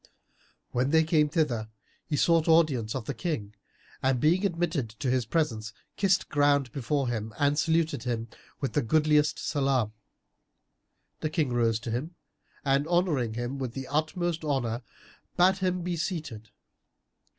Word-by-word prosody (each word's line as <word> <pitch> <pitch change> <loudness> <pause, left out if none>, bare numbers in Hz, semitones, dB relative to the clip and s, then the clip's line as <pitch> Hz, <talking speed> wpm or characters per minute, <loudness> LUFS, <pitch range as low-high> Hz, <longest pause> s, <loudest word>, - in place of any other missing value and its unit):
When 125 +2 +1
they 160 +1 +5
came 155 -2 +3
thither, 130 -9 0 0.4
he 150 - -1
sought 165 +2 +3
audience 150 -9 +3
of 130 -4 -4
the - - -3
King 120 - -3 0.5
and 130 -1 +2
being 170 +8 +3
admitted 170 - 0
to 115 +4 -3
his 125 -2 0
presence, 115 -9 -1 0.2
kissed 195 -1 +2
ground 145 -3 +2
before 140 +1 -1
him 110 -2 -3
and 145 +1 +2
saluted 165 0 +1
him 115 -2 -2 0.3
with 135 - -2
the 145 - +2
goodliest 150 +3 +3
Salam. 135 -7 0 1.3
The 155 - -1
King 155 -5 0
rose 115 -2 +2
to 120 -2 -4
him 150 +9 -3 0.5
and 140 +2 +2
honouring 160 -10 +1
him 120 +3 -3
with 125 -3 -3
the 135 -1 -4
utmost 160 +3 -1
honour, 130 -6 -1 0.6
bade 185 +2 +4
him 180 -2 0
be 175 0 -2
seated. 155 - -4
145 Hz, 150 wpm, -28 LUFS, 120-160 Hz, 1.3 s, they